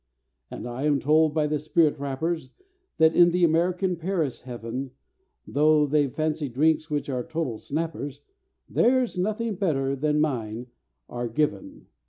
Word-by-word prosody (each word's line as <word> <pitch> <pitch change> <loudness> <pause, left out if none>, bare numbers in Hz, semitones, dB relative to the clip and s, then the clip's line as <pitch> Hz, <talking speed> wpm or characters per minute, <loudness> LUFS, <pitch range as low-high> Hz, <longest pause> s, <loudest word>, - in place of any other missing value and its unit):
"And - - -7
I 120 +4 -4
am 145 -2 +3
told 155 +2 +3
by 155 0 +1
the 150 0 -1
spirit 155 0 +2
rappers 140 +2 -3 0.5
That 160 0 +4
in 175 0 +7
the 175 +1 +1
American 175 +2 +2
Paris 165 -6 -2
heaven, 125 +1 -6 0.5
Though 150 +1 +3
they've 145 -2 +1
fancy 155 0 -2
drinks 155 +5 +1
which 150 -1 -2
are 130 -3 -2
total 160 -9 -3
snappers, 150 -2 -4 0.5
There's 250 -2 +2
nothing 215 +3 -1
better 140 -8 0
than 150 +2 0
mine 120 -6 -2 0.4
are 120 0 -4
given. 155 - -2
150 Hz, 145 wpm, -25 LUFS, 135-165 Hz, 0.5 s, in